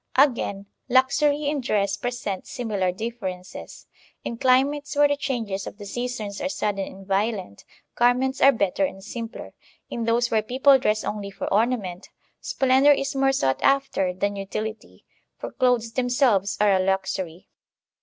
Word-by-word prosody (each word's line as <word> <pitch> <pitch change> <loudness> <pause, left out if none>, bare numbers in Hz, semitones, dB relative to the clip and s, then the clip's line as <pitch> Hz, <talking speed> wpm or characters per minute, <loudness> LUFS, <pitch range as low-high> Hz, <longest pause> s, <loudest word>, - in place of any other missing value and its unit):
Again, 235 -8 +2 0.2
luxury 285 +3 +3
in 290 -1 0
dress 200 -5 0
presents 225 -3 -4
similar 205 -7 -1
differences. 190 -3 -7 0.4
In 235 - -4
climates 275 +5 +2
where 290 0 +5
the 285 - +1
changes 230 -9 -3
of - - -8
the 205 - -9
seasons 220 -1 -4
are 280 - -1
sudden 200 -7 -2
and 195 0 -13
violent, 195 - -2 0.3
garments 250 +2 +2
are 275 - +8
better 200 -5 0
and 190 0 -3
simpler; 230 +2 -7 0.4
in 235 -1 -3
those 235 +1 +1
where 220 -1 +3
people 265 +4 +4
dress 215 -3 0
only 205 -1 -4
for 200 - -6
ornament, 210 -5 0 0.3
splendor 265 +2 +3
is 275 -1 +1
more 270 0 +3
sought 135 - 0
after 275 -9 +2
than 200 +3 -2
utility, 215 +3 -6 0.3
for - - -7
clothes 245 -3 +1
themselves 245 -6 +1
are 205 -1 +4
a 190 - +3
luxury. 190 -2 -2
225 Hz, 150 wpm, -24 LUFS, 195-260 Hz, 0.4 s, are